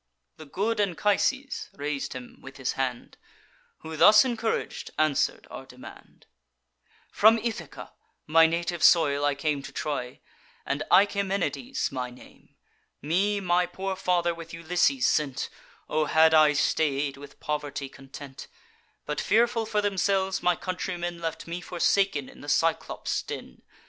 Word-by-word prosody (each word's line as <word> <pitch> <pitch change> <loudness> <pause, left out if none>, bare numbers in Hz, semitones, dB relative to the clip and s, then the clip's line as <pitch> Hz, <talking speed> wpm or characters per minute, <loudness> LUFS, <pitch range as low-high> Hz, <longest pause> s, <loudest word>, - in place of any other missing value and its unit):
The 155 - -11
good 210 +8 -1
Anchises 210 - 0
rais'd 145 0 -3
him 125 -1 -10
with 135 +1 -11
his 130 - -1
hand; 130 -2 -4 0.6
Who, 160 0 -7
thus 210 +8 +7
encourag'd, 230 -3 -2
answer'd 155 -3 +1
our - - -9
demand: - - -14 0.9
'From 220 +2 +6
Ithaca, 225 0 -6 0.3
my 165 +1 +6
native 170 0 -2
soil, 145 -4 +5
I 145 -1 +2
came 145 0 -1
To 135 0 -9
Troy; 130 -4 -4 0.5
and 140 +1 -2
Achaemenides 200 +6 +1
my 125 -2 -3
name. 125 +1 -17 0.5
Me 195 +7 +1
my 180 -1 +1
poor 190 +2 -4
father 180 -2 +1
with 165 0 -9
Ulysses 180 - +1
sent; 145 -4 0 0.4
(O 155 0 +1
had 160 +1 +4
I 155 -1 +6
stay'd, 145 -1 0
with 140 0 -13
poverty 145 -2 -3
content!) 135 0 -11 0.6
But, 150 - -2
fearful 230 0 +2
for 210 -1 0
themselves, 195 -1 0
my 180 -1 +3
countrymen 175 -2 -4
Left 165 -1 -4
me 170 +1 -5
forsaken 175 -4 +1
in - - -14
the 145 - -7
Cyclops' 165 +2 0
den. 65 - -8
165 Hz, 135 wpm, -27 LUFS, 145-195 Hz, 0.9 s, thus